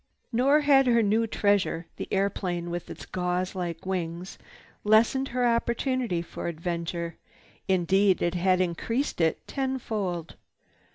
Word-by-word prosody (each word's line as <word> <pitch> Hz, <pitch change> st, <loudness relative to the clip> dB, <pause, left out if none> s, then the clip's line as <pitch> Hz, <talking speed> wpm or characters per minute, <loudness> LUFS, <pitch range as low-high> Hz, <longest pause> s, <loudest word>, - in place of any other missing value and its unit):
Nor 275 Hz, +6 st, +4 dB
had 275 Hz, -2 st, +5 dB
her 235 Hz, -2 st, +4 dB
new 220 Hz, +2 st, +2 dB
treasure, 200 Hz, -6 st, +1 dB
the -, -, -5 dB
airplane 180 Hz, -3 st, -1 dB
with 175 Hz, 0 st, -5 dB
its -, -, -8 dB
gauze 180 Hz, 0 st, -2 dB
like 175 Hz, -3 st, -4 dB
wings, 180 Hz, -1 st, -4 dB, 0.4 s
lessened 225 Hz, +5 st, +4 dB
her 250 Hz, -1 st, 0 dB
opportunity 235 Hz, -4 st, 0 dB
for 170 Hz, -, -6 dB
adventure. 170 Hz, 0 st, -3 dB, 0.5 s
Indeed 190 Hz, +1 st, +3 dB
it 175 Hz, -, +1 dB
had 185 Hz, +1 st, +2 dB
increased 185 Hz, -, -1 dB
it 160 Hz, -1 st, 0 dB
tenfold. 220 Hz, -, -3 dB
190 Hz, 125 wpm, -27 LUFS, 175-235 Hz, 0.5 s, had